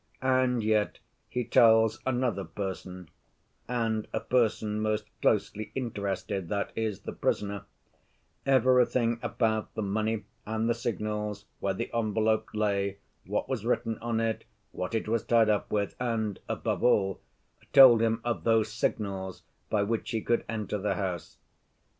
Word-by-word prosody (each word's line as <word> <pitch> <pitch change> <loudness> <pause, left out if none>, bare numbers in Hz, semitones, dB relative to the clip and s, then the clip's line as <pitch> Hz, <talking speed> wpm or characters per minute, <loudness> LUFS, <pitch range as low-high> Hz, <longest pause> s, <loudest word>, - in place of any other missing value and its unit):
And 130 -2 +2
yet 105 -1 +1 0.3
he 125 - -1
tells 110 -1 +5
another 125 -5 0
person—and 100 +5 -5
a - - -1
person 110 -3 +1
most 110 0 0 0.2
closely 105 0 +1
interested, 100 -6 -3
that 100 -1 -1
is, 110 -3 -2
the - - -6
prisoner—everything 120 +4 0
about 110 -2 0
the 110 - -2
money 110 +2 -1 0.2
and 110 +1 -1
the 120 - +3
signals, 105 -3 -3
where 95 -1 -1
the 115 - -4
envelope 110 -1 +1
lay, 100 -2 0 0.3
what - - -1
was 130 -5 -2
written 115 -1 0
on 115 -1 -1
it, 115 -1 -1 0.3
what 90 +5 -4
it 110 - -1
was 115 0 0
tied 115 -2 +4
up 105 -1 +1
with, 100 -2 -1
and, 110 -5 -1
above - - -2
all, 95 -6 +3 0.5
told 130 -5 +9
him 115 0 +1
of 120 -1 -2
those 110 -2 +2
signals 95 -5 -2 0.3
by 105 -2 +2
which 110 +2 -2
he 115 -3 -1
could 120 - +1
enter 105 -2 -2
the 105 +2 0
house. 90 -4 -4
110 Hz, 140 wpm, -29 LUFS, 105-115 Hz, 0.5 s, told